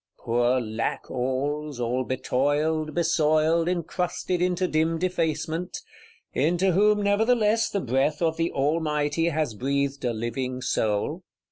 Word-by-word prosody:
Poor 120 +2 +1
Lackalls, 130 +5 -3
all 125 +2 0
betoiled, 145 +5 0
besoiled, 160 0 +2
encrusted 180 +1 -2
into 180 0 +1
dim 160 0 +1
defacement; 170 -1 -2 0.6
into 175 +6 +2
whom 210 +3 +3
nevertheless 220 +2 +2
the 200 - -1
breath 135 +4 0
of 165 -2 +1
the 165 +1 -1
Almighty 150 +1 0
has 155 -6 -1
breathed 140 +4 -1
a 120 - +1
living 120 +3 -3
soul! 110 -5 -1
155 Hz, 115 wpm, -25 LUFS, 130-170 Hz, 0.6 s, whom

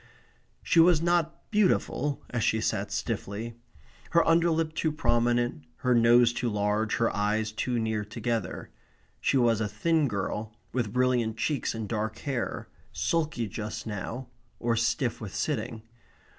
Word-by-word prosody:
She 170 - +3
was 170 -1 +6
not 170 -1 0
beautiful, 180 - +1
as 115 -3 -1
she 110 - +2
sat 110 - -1
stiffly; 110 +4 -3 0.6
her 170 - +3
underlip 165 -1 +3
too 160 0 0
prominent; 120 - +1 0.2
her 125 - +4
nose 120 0 +5
too 120 0 -1
large; 105 +1 0
her 115 - +1
eyes 105 +1 0
too 120 +3 -1
near 110 -2 -1
together. 110 -2 -3 0.5
She 140 - +2
was 115 -3 +3
a 105 - +1
thin 160 +6 +1
girl, 105 0 -3 0.2
with 120 -5 -1
brilliant 125 -3 +1
cheeks 140 0 -1
and 110 -2 -4
dark 110 0 -2
hair, 135 -4 -3 0.2
sulky 155 -8 0
just 105 +2 -5
now, 110 +4 -5 0.3
or 120 -1 +1
stiff 115 +1 0
with 105 -4 -7
sitting. 110 -1 -2
120 Hz, 145 wpm, -28 LUFS, 110-140 Hz, 0.6 s, was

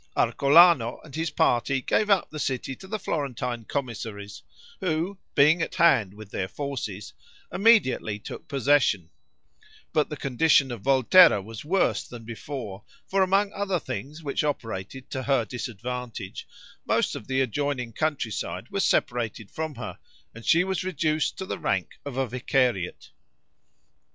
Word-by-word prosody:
Arcolano 140 -4 +5
and 155 - -14
his 165 +1 -1
party 135 -2 +2
gave 210 +10 +1
up 195 -3 +3
the 155 - -6
city 130 -1 -2
to 190 - -13
the 215 +3 -3
Florentine 125 - -3
commissaries, 110 -7 -5 0.4
who, 180 +2 -2 0.2
being 155 +5 +5
at - - -2
hand 110 - +4
with 105 -1 -12
their 95 - -2
forces, 105 - -5 0.4
immediately 195 - +3
took 105 - -9
possession; 135 - +2 0.8
but 150 -2 +2
the 150 - -5
condition 140 0 +3
of 120 -4 -6
Volterra 135 - +6
was 110 +3 -9
worse 180 +5 +1
than 120 -2 -10
before; 115 -4 -7 0.2
for 195 0 +1
among 195 +2 +2
other 200 -2 -1
things 145 +4 -6
which 140 0 -1
operated 130 -2 -4
to 130 - -3
her 130 -3 +1
disadvantage, 120 -2 -6 0.4
most - - +1
of - - -8
the 130 0 0
adjoining 130 -1 -1
countryside 145 -7 -2
was - - 0
separated 115 -4 0
from 160 -2 -4
her, 120 - -7 0.3
and 115 0 -11
she 170 +2 +5
was 190 0 -2
reduced 155 -4 0
to 190 - -4
the - - -4
rank 95 -2 -2
of 140 -3 -6
a 135 - +1
vicariate. 125 -5 -1
135 Hz, 145 wpm, -26 LUFS, 115-155 Hz, 0.8 s, Volterra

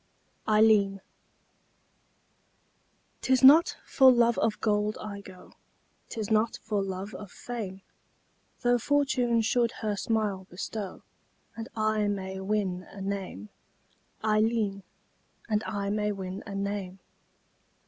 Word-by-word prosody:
AILLEEN 210 -2 +4 2.2
'Tis 260 0 +2
not 305 +6 +7
for 265 -2 +6
love 235 -1 +3
of 220 -1 0
gold 210 0 +1
I 200 -1 -6
go, 185 -2 -14 0.6
'Tis 220 -1 -4
not 220 +1 +2
for 210 -2 -1
love 195 +2 -5
of 205 - -8
fame; 195 -5 -6 0.8
Tho' 245 0 +3
Fortune 250 -3 +2
should 235 +1 +1
her 210 -1 0
smile 205 -3 -1
bestow, 195 +2 -6 0.5
And 225 0 -6
I 215 -1 +1
may 190 -2 -3
win 190 -2 -2
a 200 - -11
name, 190 - -4 0.7
Ailleen, 215 -2 +1 0.7
And 215 -1 0
I 200 -1 -2
may 210 0 0
win 190 -1 -5
a 200 - -6
name. 195 -2 -3
210 Hz, 115 wpm, -28 LUFS, 195-225 Hz, 2.2 s, not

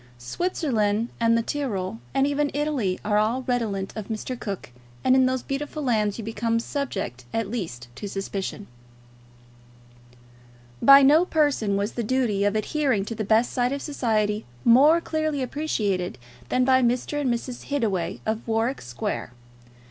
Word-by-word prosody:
Switzerland 225 - -1
and 230 0 +4
the 230 - 0
Tyrol, 200 - -3
and 270 - +2
even 285 +1 +1
Italy, 280 -11 0
are 210 0 +3
all 230 +5 0
redolent 220 -6 -2
of 215 -3 -5
Mr. 225 +3 -4
Cook, 200 - -5 0.3
and 260 - +5
in 260 -1 +5
those 260 -1 -1
beautiful 295 +2 -4
lands 215 -5 +1
you 230 - -5
become 230 +1 -1
subject 195 - -4
at 225 -3 -2
least 140 - -5
to 205 - -5
suspicion. 195 +1 -4 2.2
By 275 0 +9
no 300 +5 +6
persons 290 - +1
was 200 +2 -1
the 240 - -3
duty 230 -4 +1
of 205 +1 +1
adhering 250 -2 0
to 230 - -4
the 215 - -3
best 220 +3 +3
side 245 0 +1
of 280 0 -3
society 215 -7 0 0.2
more 290 +8 +6
clearly 310 -4 -1
appreciated 210 - -1 0.3
than 255 - +2
by 260 0 +5
Mr. 250 +4 0
and 260 -4 +1
Mrs. 240 +1 -4
Hittaway 215 -12 -1
of 220 +2 -2
Warwick 230 +4 0
Square. 120 0 -4
230 Hz, 155 wpm, -25 LUFS, 205-275 Hz, 2.2 s, By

